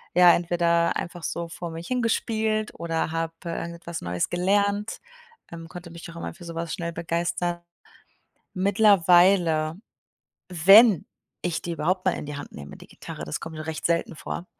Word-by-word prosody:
äh, 180 Hz, -, +3 dB
ja, 175 Hz, -1 st, +9 dB
entweder 170 Hz, -1 st, +1 dB
einfach 170 Hz, -1 st, -6 dB
so 170 Hz, 0 st, -3 dB
vor 170 Hz, 0 st, -6 dB
mich 165 Hz, +1 st, -7 dB
hin 250 Hz, -1 st, 0 dB
gespielt 220 Hz, -1 st, 0 dB
oder 165 Hz, -1 st, -1 dB
habe, 165 Hz, 0 st, -2 dB
äh, 170 Hz, -, -3 dB
irgendetwas 170 Hz, 0 st, -6 dB
Neues 90 Hz, 0 st, -2 dB
gelernt, 200 Hz, +3 st, 0 dB, 0.5 s
ähm, 165 Hz, -1 st, -8 dB
konnte 175 Hz, 0 st, -9 dB
mich 170 Hz, 0 st, -9 dB
auch 170 Hz, -, -11 dB
immer -, -, -5 dB
für 175 Hz, -, -13 dB
sowas 165 Hz, 0 st, -5 dB
schnell 170 Hz, -1 st, -4 dB
begeistern. 170 Hz, +1 st, -2 dB, 0.9 s
Mittlerweile, 180 Hz, -4 st, +4 dB, 0.7 s
wenn 195 Hz, +3 st, +7 dB, 0.4 s
ich 165 Hz, -1 st, -2 dB
die 175 Hz, -, -4 dB
überhaupt 180 Hz, +4 st, 0 dB
mal 185 Hz, -, +4 dB
in -, -, -6 dB
die 145 Hz, 0 st, -6 dB
Hand 145 Hz, -, -8 dB
nehme, 70 Hz, 0 st, -9 dB
die -, -, -14 dB
Gitarre, -, -, -9 dB
das 75 Hz, -, -4 dB
kommt 165 Hz, -1 st, -8 dB
nur 155 Hz, 0 st, -6 dB
recht 160 Hz, -1 st, -5 dB
selten 170 Hz, +1 st, +1 dB
vor, 170 Hz, -, -6 dB
170 Hz, 175 wpm, -25 LUFS, 165-185 Hz, 0.9 s, ja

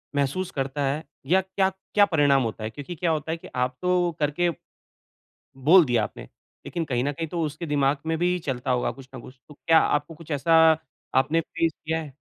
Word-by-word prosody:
महसूस 145 Hz, +6 st, -1 dB
करता 135 Hz, +1 st, -3 dB
है? 140 Hz, +4 st, -1 dB, 0.2 s
या 185 Hz, +7 st, +3 dB
क्या 190 Hz, +1 st, 0 dB
क्या 195 Hz, +2 st, +1 dB
परिणाम 145 Hz, -7 st, +3 dB
होता 110 Hz, -1 st, -4 dB
है 110 Hz, -, -2 dB
क्योंकि 145 Hz, +8 st, -8 dB
क्या 170 Hz, 0 st, 0 dB
होता 155 Hz, 0 st, -2 dB
है 165 Hz, -, -2 dB
कि -, -, -12 dB
आप 125 Hz, 0 st, 0 dB
तो 180 Hz, -1 st, +2 dB
करके 150 Hz, +4 st, +1 dB, 1.2 s
बोल 180 Hz, -1 st, +8 dB
दिया 120 Hz, -4 st, +1 dB
आपने। -, -, -6 dB, 0.4 s
लेकिन 170 Hz, -2 st, -3 dB
कहीं 125 Hz, -4 st, -1 dB
न 145 Hz, -, 0 dB
कहीं, 165 Hz, +3 st, -4 dB
तो 170 Hz, +2 st, -3 dB
उसके 155 Hz, +3 st, -5 dB
दिमाग 145 Hz, -2 st, +1 dB
में 160 Hz, 0 st, 0 dB
भी 180 Hz, +2 st, +1 dB
चलता 130 Hz, -1 st, -2 dB
होगा 125 Hz, -1 st, +1 dB
कुछ 135 Hz, -1 st, -14 dB
न -, -, -7 dB
कुछ। 130 Hz, +1 st, -14 dB
तो 150 Hz, -, -13 dB
क्या 160 Hz, +2 st, +4 dB
आपको 150 Hz, +2 st, 0 dB
कुछ 160 Hz, 0 st, -12 dB
ऐसा 160 Hz, +3 st, +4 dB, 0.5 s
आपने 150 Hz, +5 st, +3 dB
फेस 165 Hz, 0 st, -1 dB
किया 160 Hz, +1 st, 0 dB
हैं? 145 Hz, -4 st, -10 dB
150 Hz, 210 wpm, -25 LUFS, 135-170 Hz, 1.2 s, बोल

